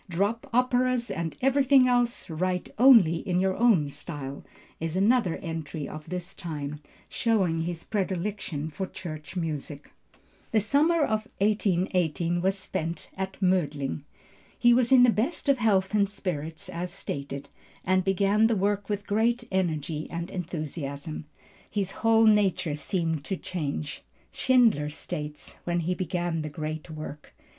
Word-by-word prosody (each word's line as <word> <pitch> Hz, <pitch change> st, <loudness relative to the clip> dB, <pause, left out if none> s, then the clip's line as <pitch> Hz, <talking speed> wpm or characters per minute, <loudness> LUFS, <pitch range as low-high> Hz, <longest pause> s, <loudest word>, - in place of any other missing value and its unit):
"Drop 205 Hz, +10 st, -1 dB
operas 250 Hz, -1 st, +2 dB
and 165 Hz, -2 st, -3 dB
everything 270 Hz, -1 st, +5 dB
else, 245 Hz, -1 st, +1 dB
write 180 Hz, +2 st, -2 dB
only 230 Hz, -11 st, +7 dB
in 180 Hz, 0 st, -1 dB
your 190 Hz, 0 st, +1 dB
own 195 Hz, -12 st, +3 dB
style," 140 Hz, -3 st, -7 dB, 0.4 s
is 165 Hz, +1 st, -3 dB
another 200 Hz, -2 st, +3 dB
entry 160 Hz, -3 st, -4 dB
of 155 Hz, +1 st, -9 dB
this 180 Hz, +1 st, -5 dB
time, 150 Hz, -3 st, -5 dB, 0.3 s
showing 190 Hz, -8 st, +1 dB
his 170 Hz, 0 st, -4 dB
predilection 190 Hz, -6 st, -2 dB
for 190 Hz, +5 st, -4 dB
church 155 Hz, -3 st, -8 dB
music. 150 Hz, -4 st, -4 dB, 0.6 s
The 220 Hz, -, +4 dB
summer 295 Hz, +10 st, +3 dB
of 215 Hz, -4 st, 0 dB
1818 180 Hz, -5 st, +1 dB
was 190 Hz, +2 st, +1 dB
spent 165 Hz, -3 st, -4 dB
at 190 Hz, 0 st, -4 dB
Mödling. 150 Hz, -, 0 dB, 0.6 s
He 240 Hz, 0 st, +5 dB
was 245 Hz, 0 st, +3 dB
in 255 Hz, -2 st, +8 dB
the 245 Hz, -, +6 dB
best 255 Hz, +10 st, -1 dB
of 275 Hz, -2 st, +4 dB
health 200 Hz, -3 st, +2 dB
and 200 Hz, -2 st, +3 dB
spirits 170 Hz, -2 st, -4 dB
as 180 Hz, 0 st, -4 dB
stated, 140 Hz, -5 st, -5 dB, 0.4 s
and 185 Hz, +1 st, +3 dB
began 200 Hz, +3 st, +3 dB
the 230 Hz, -, +1 dB
work 205 Hz, +1 st, 0 dB
with 205 Hz, 0 st, -2 dB
great 230 Hz, +4 st, +1 dB
energy 160 Hz, -4 st, -1 dB
and 170 Hz, +2 st, -5 dB
enthusiasm. 155 Hz, -4 st, -5 dB, 0.4 s
His 195 Hz, -2 st, -1 dB
whole 225 Hz, 0 st, +5 dB
nature 205 Hz, -7 st, +3 dB
seemed 160 Hz, 0 st, -1 dB
to 190 Hz, -, -2 dB
change, 150 Hz, -3 st, -4 dB, 0.3 s
Schindler 230 Hz, -, +3 dB
states, 150 Hz, 0 st, -7 dB
when 175 Hz, 0 st, 0 dB
he 175 Hz, +3 st, 0 dB
began 175 Hz, -2 st, -2 dB
the 155 Hz, -, -4 dB
great 155 Hz, +2 st, -5 dB
work. 155 Hz, -1 st, -8 dB
185 Hz, 140 wpm, -27 LUFS, 160-215 Hz, 0.6 s, in